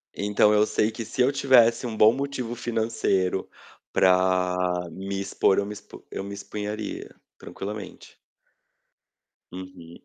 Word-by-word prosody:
Então, 105 +1 +3
eu 105 0 +4
sei 110 - +1
que 115 +1 -6
se 115 - -2
eu 125 +2 +4
tivesse 130 -4 +4
um 115 -2 -4
bom 110 +1 +6
motivo 130 -2 -4
financeiro 110 -6 -1 0.5
para 90 0 +3 0.3
me 95 +3 -5
expor, 95 0 +1
eu 100 - -1
me 105 - -6
expu 100 - -13
eu - - -4
me 100 0 -7
exporia 105 +1 -6 0.2
tranquilamente. 105 +1 -8 1.3
Uhum. 90 -2 -10
105 Hz, 130 wpm, -25 LUFS, 95-115 Hz, 1.3 s, bom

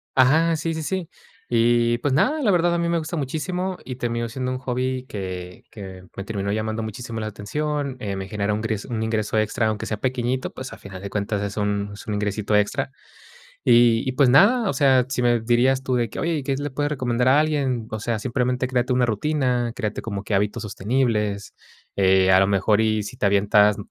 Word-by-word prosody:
Ajá, 160 +6 +4
sí, 165 +2 -2
sí, 160 0 -4
sí. 185 0 -3 0.4
Y 120 0 +3
pues 140 0 0
nada, 300 - +2
la 210 - +4
verdad 175 -1 +3
a - - +1
mí 170 0 0
me 170 -1 +1
gusta 160 +2 -5
muchísimo, 180 +6 -3
y 130 - -6
terminó 120 -1 -2
siendo 130 +2 -3
un 130 - -3
hobby, 130 0 -2
que 90 -4 -6
que 95 -3 -9
me 95 - -5
terminó 100 -2 -3
llamando 110 +1 -2
muchísimo 115 +1 -6
la 110 - -3
atención. 140 +7 -3
Eh, 100 -3 -3
me 95 0 -5
genera 105 0 -1
un 105 - -2
gres 110 -2 -3
un 115 -2 -3
ingreso 110 -1 -1
extra; 110 +2 0
aunque 110 -1 -2
sea 110 - -2
pequeñito, 130 0 -1
pues, 130 -3 -7
a - - -10
final 100 -3 -10
de 100 - -6
cuentas, 100 0 -2
es 100 +1 -4
un 100 -1 -1
es 100 - -11
un 105 - -3
ingresito 105 +1 -1
extra. 130 +6 +1 0.7
Y 120 0 +5
y, 130 - 0
pues 130 0 +4
nada, 205 - +5
o - - +1
sea, 130 -4 +4
si 130 -2 -1
me 120 -1 +3
dirías 125 +3 +2
tú, 130 -1 -1
de 120 -3 0
que: - - -8
"Oye, 170 0 0
¿y - - -4
qué 135 +1 -1
se 145 - -4
le 145 - -3
puede 145 +3 -1
recomendar 125 -3 0
a 140 +3 +5
alguien?". 140 -7 0
O 110 - -3
sea, 115 0 -1
simplemente, 125 +1 -1
créate 125 0 0
una 125 -1 +3
rutina, 125 0 0
créate 105 -4 -3
como 100 -3 -4
que 105 - -2
hábitos 105 +3 0
sostenibles. 105 -1 -1 0.4
Eh, 95 -1 +4
a 95 - +6
lo 95 - +4
mejor, 100 +2 +2
y 110 -1 +1
si 115 - -8
te 110 - -3
avientas 105 +1 +4
120 Hz, 225 wpm, -23 LUFS, 105-135 Hz, 0.7 s, a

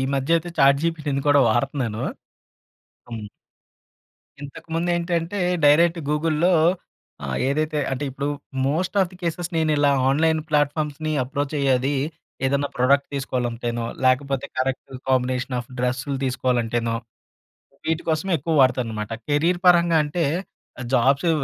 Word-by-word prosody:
మధ్య 135 +5 +2
అయితే 175 +2 -6
చాట్‌జిపిటిని 140 0 +2
కూడా 145 -1 +6
వాడుతున్నాను. 120 -1 -1 1.1
హ్మ్. 110 -2 -6 1.2
ఇంతకు 140 +2 -10
ముందేంటంటే, 175 +2 -1 0.3
డైరెక్ట్ 165 +3 +5
గూగుల్‌లో 160 +3 +2 0.7
ఆహ్, - - -3
ఏదైతే 155 +2 0
అంటే 135 +2 -2
ఇప్పుడు 140 +2 -4 0.4
మోస్ట్ 175 +8 -1
ఆఫ్ 180 - 0
ది 180 - -14
కేసెస్ 170 +1 -2
నేను 160 -1 +2
ఇలా 145 0 +4 0.2
ఆన్‍లైన్ 160 +3 +2
ప్లాట్‍ఫామ్స్‌ని 150 +1 0
అప్రోచ్ 140 +3 -3
అయ్యేది 135 0 +2 0.5
ఏదైనా 140 +1 +1
ప్రోడక్ట్ 140 +3 +3
తీసుకోవాలంటేనో, 120 -3 -2 0.2
లేకపోతే 135 +1 +1
కరెక్ట్ 130 +1 -2 0.2
కాంబినేషన్ 125 0 0
ఆఫ్ 120 - -9
డ్రెస్సులు 125 +2 -1
తీసుకోవాలంటేనో 120 -2 0 0.9
వీటి 160 0 0
కోసమే 160 +5 0
ఎక్కువ 160 +4 -2
వాడుతానన్నమాట. 115 -5 0 0.2
కెరీర్ 165 +5 +1
పరంగా 170 -2 +5
అంటే, 160 +3 -2 0.7
జాబ్సు 135 +6 +3
140 Hz, 115 wpm, -23 LUFS, 130-160 Hz, 1.2 s, కూడా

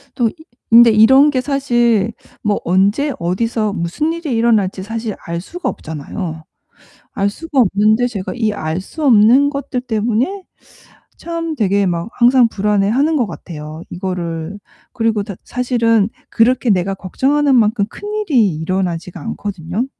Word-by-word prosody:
또 240 -4 +1
이 - - -13 0.4
근데 235 0 +8
이런 265 +7 +6
게 260 - 0
사실 240 -6 +1 0.3
뭐 210 -1 +1
언제 200 - +2
어디서 215 +5 -1
무슨 190 - -2
일이 330 -5 -4
일어날지 215 -5 +1
사실 225 0 -4
알 170 0 -3
수가 355 - -5
없잖아요. 160 +2 -6 0.7
알 200 0 0
수가 310 +4 -5
없는데 215 +2 +3
제가 205 -6 -5
이 220 -3 0
알 160 -2 -3
수 305 - -7
없는 250 +3 +5
것들 280 -3 -4
때문에 245 - -1 0.7
참 330 -1 -4
되게 200 -4 +1
막 170 +2 -2
항상 245 0 +4
불안해 205 -2 0
하는 290 +7 +2
것 245 -5 +1
같아요, 155 -2 -9
이거를. 175 -1 -4 0.4
그리고 225 -3 0
다 200 -1 -7
사실은 230 -4 +1 0.2
그렇게 245 +1 +2
내가 195 0 +1
걱정하는 270 +9 +1
만큼 215 -2 +2
큰일이 335 - 0
일어나지가 175 +1 -3
않거든요. 190 - -4
220 Hz, 295 characters per minute, -17 LUFS, 190-255 Hz, 0.7 s, 근데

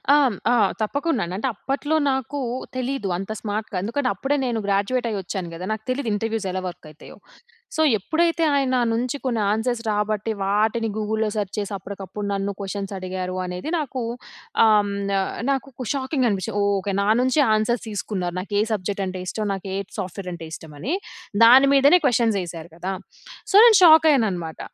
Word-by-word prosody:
ఆహ్, 270 -7 +3 0.2
ఆ! - - +4 0.3
తప్పకుండాండి. 235 - -1
అంటే, 245 - -1
అప్పట్లో 285 +6 -2
నాకూ 265 +1 -2 0.3
తెలీదు 255 -4 -2
అంత 195 +3 -5
స్మార్ట్‌గా. 210 -1 -3
ఎందుకంటే, 255 +4 -1
అప్పుడే 270 +9 0
నేను 235 -3 -1
గ్రాడ్యూయేటయ్యొచ్చాను 200 -3 -1
గదా! 170 +2 -6
నాకు 220 0 -6
తెలీదు 255 -2 -1
ఇంటర్‌వ్యూసెలా 205 -3 -2
వర్కయితాయో. 155 -3 -11 0.6
సో, 315 - +1 0.2
ఎప్పుడైతే, 330 - +1
ఆయన 275 -2 +1
నా 250 - +2
నుంచి 245 +4 -1
కొన్ని 235 -4 0
ఆన్సర్స్ 230 +2 -1
రాబట్టి, 210 +1 -1
వాటిని 215 +3 +1
గూగుల్‌లో 220 0 0
సర్చ్ 205 -1 -2
చేసి, 205 0 -4
అప్పడకప్పుడు 200 +1 -7
నన్ను 195 0 -1
కొషన్సడిగారు 190 -2 -4
అనేది 180 +9 -5
నాకూ 270 -5 -3 0.6
ఆహ్, 210 -2 +4 0.2
న - - -1 0.4
నాకొక 265 -3 -3
షాకింగనిపిచ్చి, 255 - -1
ఓహ్! 200 0 +2
ఓకే. 200 +1 -3
నా 200 - 0
నుంచే 260 +4 +3
ఆన్సర్స్ 220 +3 0
తీసుకున్నారు. 190 -4 -3
నాకు 200 +3 -7
ఏ - - +4
సబ్జెక్టంటే 190 -2 -2
ఇష్టం, 215 +2 -2
నాకేట్ 195 0 -5
సాఫ్ట్‌వేరంటే 180 -3 -6
ఇష్టమనీ. 160 - -5 0.5
దాని 265 +4 +8
మీదనే 285 +6 +6
క్వషన్సేశారు 190 - 0
గదా! 185 +3 -4 0.6
సో, - - +1
నేను 455 -4 +8
షాకయ్యాననమాట. 245 - +5
215 Hz, 145 wpm, -23 LUFS, 195-255 Hz, 0.6 s, దాని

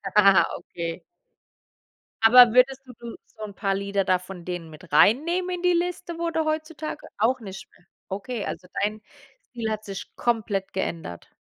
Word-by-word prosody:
Ah, 195 -5 +7
okay. 165 -1 -6 1.2
Aber 240 0 +8
würdest 260 +1 +4
du 250 - -12
du 235 -1 -8
so 220 - -12
'n 205 -2 -6
paar 195 -1 0
Lieder 200 0 -1
da 185 -1 +2
von 185 -1 -10
denen 175 -2 -5
mit 160 +3 -14
reinnehmen 345 - +3
in 350 - -7
die 360 0 +3
Liste, 345 0 -2
wo 335 0 -1
du 320 -1 0
heutzutage 310 0 -4
auch 240 +5 +2
nicht 195 -4 -9
mehr? 175 - -25 0.2
Okay, 205 +3 -4
also 180 +2 -6 0.2
dein 210 +1 -1 0.5
Ziel 230 -2 -2
hat 215 0 -4
sich 195 -1 -7
komplett 215 -5 -1
geändert. 165 - -4
215 Hz, 170 wpm, -25 LUFS, 190-270 Hz, 1.2 s, Aber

